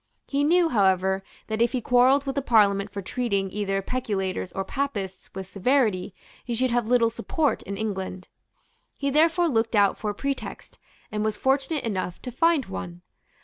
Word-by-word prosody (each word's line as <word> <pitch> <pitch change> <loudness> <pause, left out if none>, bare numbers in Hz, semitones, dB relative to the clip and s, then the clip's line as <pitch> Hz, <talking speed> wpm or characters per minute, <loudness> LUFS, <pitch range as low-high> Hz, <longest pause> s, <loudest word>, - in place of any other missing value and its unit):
He 280 0 0
knew, 340 +2 +4
however, 190 - +2 0.2
that 220 +1 -2
if 235 - +2
he 255 - +1
quarrelled 250 +4 +4
with 270 - -2
the 280 - -1
Parliament 205 -5 +3
for 200 0 -6
treating 200 -3 -1
either 195 -1 -1
peculators 195 -7 -2
or 195 - -3
Papists 200 -8 -4
with 190 0 -5
severity, 200 -2 +1 0.3
he 240 - -3
should 255 +1 +1
have 240 -2 +1
little 235 -1 +3
support 295 +5 -1
in 200 0 -6
England. 190 -3 -4 0.7
He 280 -1 -1
therefore 330 +4 +3
looked 225 -5 +1
out 200 -1 +3
for 210 - -2
a 205 - -3
pretext, 275 0 -5 0.3
and 210 0 -1
was 215 -1 -1
fortunate 270 +5 0
enough 185 -5 -3
to 250 - -5
find 320 +1 +2
one. 90 -2 -7
220 Hz, 175 wpm, -25 LUFS, 195-265 Hz, 0.7 s, knew